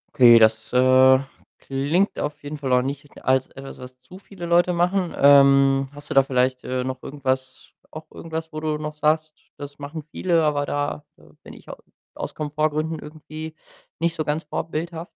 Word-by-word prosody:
Okay, 120 Hz, -2 st, +8 dB
das, 110 Hz, 0 st, +3 dB
äh, 130 Hz, +1 st, +6 dB, 0.4 s
klingt 145 Hz, +9 st, -1 dB
auf 145 Hz, 0 st, -5 dB
jeden 145 Hz, +1 st, -7 dB
Fall 135 Hz, -3 st, -3 dB
auch 125 Hz, 0 st, +3 dB
nicht 140 Hz, +2 st, -7 dB
als 130 Hz, 0 st, +2 dB
etwas, 135 Hz, 0 st, -11 dB
was 125 Hz, 0 st, -11 dB
zu 130 Hz, +9 st, -14 dB
viele 195 Hz, -3 st, -10 dB
Leute 175 Hz, +1 st, +3 dB
machen. 180 Hz, +1 st, 0 dB
Ähm, 140 Hz, -1 st, +5 dB
hast 145 Hz, 0 st, -13 dB
du -, -, 0 dB
da 135 Hz, -, +7 dB
vielleicht, 130 Hz, -1 st, 0 dB
äh, 130 Hz, 0 st, -2 dB
noch 130 Hz, 0 st, -5 dB
irgendwas 130 Hz, -2 st, -4 dB, 0.2 s
auch 155 Hz, 0 st, -10 dB
irgendwas, 160 Hz, 0 st, -7 dB
wo 155 Hz, -, -4 dB
du 155 Hz, -1 st, -2 dB
noch 150 Hz, 0 st, -5 dB
sagst: 155 Hz, +1 st, 0 dB, 0.2 s
„Das 145 Hz, 0 st, -9 dB
machen 145 Hz, +2 st, -7 dB
viele, 170 Hz, -3 st, +1 dB
aber 145 Hz, -2 st, 0 dB
da, 145 Hz, +1 st, -3 dB
äh, -, -, -22 dB, 0.2 s
bin -, -, -13 dB
ich -, -, -16 dB
au -, -, -9 dB, 0.4 s
aus -, -, -6 dB
Komfortgründen 155 Hz, +1 st, -2 dB
irgendwie 155 Hz, +1 st, -9 dB, 0.4 s
nicht 165 Hz, +1 st, 0 dB
so 155 Hz, -, -2 dB
ganz 150 Hz, +1 st, -2 dB
vorbildhaft?“ 165 Hz, +2 st, -5 dB
145 Hz, 180 wpm, -22 LUFS, 130-160 Hz, 0.4 s, Okay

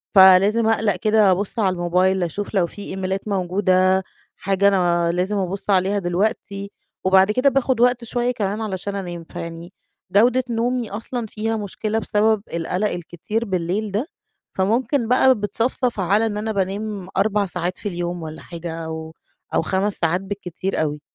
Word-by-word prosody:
فلازم 195 Hz, +4 st, +7 dB
أقلَق 220 Hz, -3 st, +2 dB
كده 210 Hz, +1 st, +3 dB
أبُص 200 Hz, +5 st, -1 dB
على 190 Hz, -4 st, +2 dB
الموبايل 180 Hz, +2 st, +1 dB
أشوف 200 Hz, +6 st, -4 dB
لو 185 Hz, -4 st, +2 dB
في 205 Hz, -, -10 dB
إيميلات 190 Hz, 0 st, -4 dB
موجودة، 185 Hz, -1 st, +2 dB, 0.3 s
حاجة 195 Hz, +1 st, +1 dB
أنا 175 Hz, -3 st, +2 dB
لازم 185 Hz, +4 st, -1 dB
أبُص 195 Hz, +1 st, -3 dB
عليها 195 Hz, +1 st, +2 dB
دلوقتي 200 Hz, +2 st, -2 dB, 0.3 s
وبعد 190 Hz, +2 st, +5 dB
كده 255 Hz, +6 st, +3 dB
باخُد 265 Hz, -3 st, +1 dB
وقت 245 Hz, 0 st, +3 dB
شوية 240 Hz, +1 st, 0 dB
كمان 210 Hz, -2 st, -2 dB
علشان 200 Hz, -1 st, -3 dB
أنام، 175 Hz, -3 st, -5 dB
فيعني 165 Hz, +2 st, -8 dB, 0.4 s
جودة 245 Hz, +5 st, +4 dB
نومي 235 Hz, 0 st, -1 dB
أصلًا 230 Hz, +3 st, -4 dB
فيها 220 Hz, +1 st, -2 dB
مشكلة 215 Hz, +1 st, -2 dB
بسبب 215 Hz, 0 st, +2 dB
القَلَق 180 Hz, +5 st, -1 dB
الكتير 175 Hz, +6 st, -4 dB
بالليل 190 Hz, +2 st, -2 dB
ده، 215 Hz, +9 st, -1 dB, 0.5 s
فممكن 230 Hz, +6 st, +1 dB
بقى 255 Hz, +2 st, +5 dB
بتصَفْصَف 225 Hz, +3 st, -1 dB
على 200 Hz, +4 st, +2 dB
إن 210 Hz, -2 st, -2 dB
أنا 220 Hz, +1 st, -2 dB
بانام 200 Hz, 0 st, -3 dB
4 205 Hz, +1 st, +2 dB
ساعات 180 Hz, 0 st, -3 dB
في 205 Hz, -, -4 dB
اليوم 175 Hz, -1 st, -4 dB
والّا 155 Hz, 0 st, -7 dB
حاجة 170 Hz, -1 st, -7 dB
أو 160 Hz, 0 st, -6 dB, 0.4 s
أو -, -, +2 dB
5 195 Hz, +4 st, 0 dB
ساعات 170 Hz, +2 st, 0 dB
بالكتير 195 Hz, -2 st, -4 dB
أوي. 150 Hz, -1 st, -2 dB
195 Hz, 155 wpm, -21 LUFS, 180-220 Hz, 0.5 s, فلازم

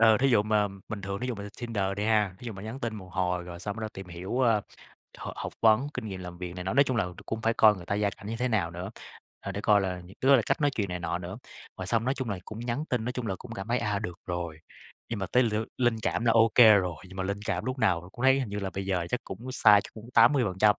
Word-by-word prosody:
Ừ, 110 Hz, -1 st, +7 dB
thí 135 Hz, -, +4 dB
dụ 110 Hz, -5 st, +4 dB
mà 105 Hz, -1 st, +2 dB, 0.2 s
bình 110 Hz, -, -4 dB
thường 100 Hz, +2 st, -4 dB
thí 125 Hz, -, -2 dB
dụ 125 Hz, -, -1 dB
mà 100 Hz, -, -7 dB
lên 105 Hz, -, -7 dB
Tinder 115 Hz, -5 st, -1 dB
đi 105 Hz, -, -1 dB
ha, 105 Hz, -4 st, +2 dB
thí 125 Hz, -, -10 dB
dụ 115 Hz, -, -4 dB
mà 95 Hz, -1 st, -9 dB
nhắn 110 Hz, +5 st, -6 dB
tin 115 Hz, -2 st, -2 dB
một 95 Hz, -2 st, -10 dB
hồi 90 Hz, -1 st, 0 dB
rồi 85 Hz, -1 st, -8 dB
xong 100 Hz, +4 st, -5 dB
bắt 115 Hz, -, -6 dB
đầu 110 Hz, -, -3 dB
tìm 95 Hz, -1 st, -8 dB
hiểu, 90 Hz, +8 st, -4 dB
ờ, 115 Hz, -4 st, +4 dB, 0.6 s
h -, -, -6 dB
học -, -, -5 dB
vấn, 110 Hz, +4 st, +5 dB
kinh -, -, -4 dB
nghiệm 95 Hz, -3 st, -6 dB
làm 90 Hz, -1 st, -8 dB
việc 90 Hz, -1 st, -6 dB
này 90 Hz, -1 st, -6 dB
nọ, 95 Hz, -, -1 dB
nói 140 Hz, +2 st, +6 dB
chung 130 Hz, -3 st, -1 dB
là 100 Hz, -, +1 dB, 0.2 s
cũng 110 Hz, -, -3 dB
phải 115 Hz, +1 st, +2 dB
coi 110 Hz, -2 st, +6 dB
người 90 Hz, -2 st, -10 dB
ta 100 Hz, -, -1 dB
gia 105 Hz, 0 st, +1 dB
cảnh 100 Hz, -, -12 dB
như 115 Hz, +2 st, -3 dB
thế 125 Hz, +1 st, +1 dB
nào 100 Hz, -8 st, +1 dB
nữa, 90 Hz, +3 st, -6 dB, 0.5 s
ờ, 100 Hz, -, -5 dB
để 100 Hz, -, -4 dB
coi 105 Hz, 0 st, +4 dB
là, 90 Hz, -2 st, -2 dB
những 95 Hz, +4 st, -14 dB
cái 130 Hz, -, +1 dB
đó 140 Hz, -, +9 dB
là 120 Hz, -, +2 dB
cách -, -, +1 dB
nói 145 Hz, -, +3 dB
chuyện 105 Hz, -5 st, -1 dB
này 90 Hz, 0 st, -3 dB
nọ 85 Hz, 0 st, -2 dB
nữa. 90 Hz, +4 st, -7 dB, 0.4 s
Rồi 95 Hz, -, -4 dB
xong 115 Hz, +2 st, +1 dB
nói 130 Hz, +2 st, +1 dB
chung 130 Hz, -5 st, -3 dB
là 100 Hz, -, -2 dB
cũng 110 Hz, -, -8 dB
nhắn 120 Hz, +5 st, -2 dB
tin, 120 Hz, -3 st, 0 dB
nói 125 Hz, -, -2 dB
chung 125 Hz, -3 st, -4 dB
là 95 Hz, -, -1 dB
cũng 120 Hz, +3 st, -10 dB
cảm 95 Hz, -1 st, -6 dB
thấy, 120 Hz, +1 st, +2 dB
à, 105 Hz, -4 st, -1 dB
được 90 Hz, -2 st, -6 dB
rồi. 85 Hz, -3 st, -4 dB, 0.5 s
Nhưng 115 Hz, -, -3 dB
mà 95 Hz, -, -2 dB
tới 125 Hz, -, +5 dB
l 115 Hz, -3 st, 0 dB, 0.2 s
linh 120 Hz, -2 st, +3 dB
cảm 115 Hz, -, 0 dB
là 115 Hz, -, +4 dB
ô 115 Hz, 0 st, +5 dB
kê 110 Hz, -3 st, +9 dB
rồi, 90 Hz, -4 st, +1 dB
nhưng 95 Hz, -, -12 dB
mà 95 Hz, -, -1 dB
linh 100 Hz, +2 st, -2 dB
cảm -, -, -1 dB
lúc 130 Hz, +1 st, -3 dB
nào 90 Hz, -6 st, +1 dB
cũng 120 Hz, -, -5 dB
thấy 135 Hz, +1 st, +5 dB
hình 130 Hz, -, -3 dB
như 100 Hz, +1 st, -4 dB
là 95 Hz, -1 st, -3 dB
bây 95 Hz, +1 st, -5 dB
giờ 90 Hz, -3 st, 0 dB
chắc 125 Hz, -, 0 dB
cũng 120 Hz, +7 st, -7 dB
sai 105 Hz, -4 st, +6 dB
chắc -, -, -10 dB
cũng 110 Hz, +1 st, -11 dB
80%. 105 Hz, -7 st, +5 dB
105 Hz, 320 wpm, -28 LUFS, 95-115 Hz, 0.6 s, đó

